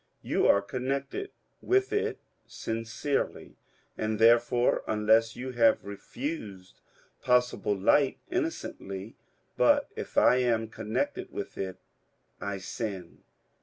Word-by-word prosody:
You - - +2
are 100 - +5
connected 135 - -3 0.3
with 390 +2 +2
it 415 - 0 0.3
sincerely, 115 +5 -3 0.4
and, 110 0 -2
there 115 +2 +7
fore, 120 +1 +1
unless 110 +1 +3
you 130 +1 -5
have 115 -2 +3
refused 100 - -6 0.4
possible 125 -5 +2
light, 130 +8 +3
innocently; 115 - -4 0.4
but - - +4
if - - -7
I 125 - +6
am 115 -3 +1
connected 110 0 -3
with - - -6
it, 95 -1 -4 0.6
I 100 -1 -3
sin. 95 -2 -6
115 Hz, 110 wpm, -29 LUFS, 105-130 Hz, 0.6 s, there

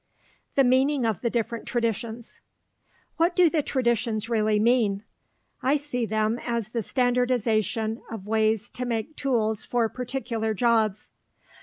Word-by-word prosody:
THE 275 - +5
MEANING 260 +1 +3
OF 220 -6 -1
THE 235 - 0
DIFFERENT 230 0 -3
TRADITIONS 230 -1 -3 0.8
What 340 +2 +2
do 355 -3 +5
the 315 - +2
traditions 235 -5 0
really 215 -2 +2
mean? 215 -3 +2 0.6
I 275 +3 +3
see 250 -5 -3
them 220 +2 0
as 235 -3 -2
the 230 +1 -2
standardization 230 -2 0
of 220 -4 -7
ways 220 0 +1
to 250 - -4
make 235 +5 -3
tools 220 -6 0
for 240 -2 +1
particular 235 -3 -3
jobs. 220 -2 +1
230 Hz, 135 wpm, -26 LUFS, 220-250 Hz, 0.8 s, THE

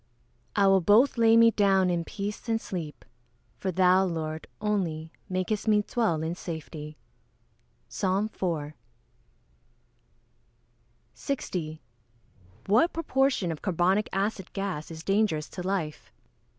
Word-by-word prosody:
[Verse: 200 - +3
"I - - +5
will 195 -1 +5
both 215 +10 +5
lay 230 -1 +5
me 230 0 +7
down 195 -3 +3
in 170 -1 0
peace 205 +6 -6
and 225 0 +2
sleep: 165 -8 -6 0.5
for 190 - -1
thou, 185 +1 +4
Lord, 160 -3 -3
only, 175 -7 -2 0.2
makest 185 +4 -2
me 210 -1 +4
dwell 205 -10 0
in 160 +1 -2
safety." 160 -3 -7 0.9
PSALM 200 +2 -1
IV.] 155 -5 -2 2.4
60. 165 - -4 0.8
_What 230 - +4
proportion 270 - +1
of 155 - -6
carbonic 190 +2 +1
acid 195 0 -2
gas 195 -6 -3
is 160 -1 -8
dangerous 195 -7 +1
to 180 - -7
life? 180 -5 -3
190 Hz, 120 wpm, -27 LUFS, 165-210 Hz, 2.4 s, me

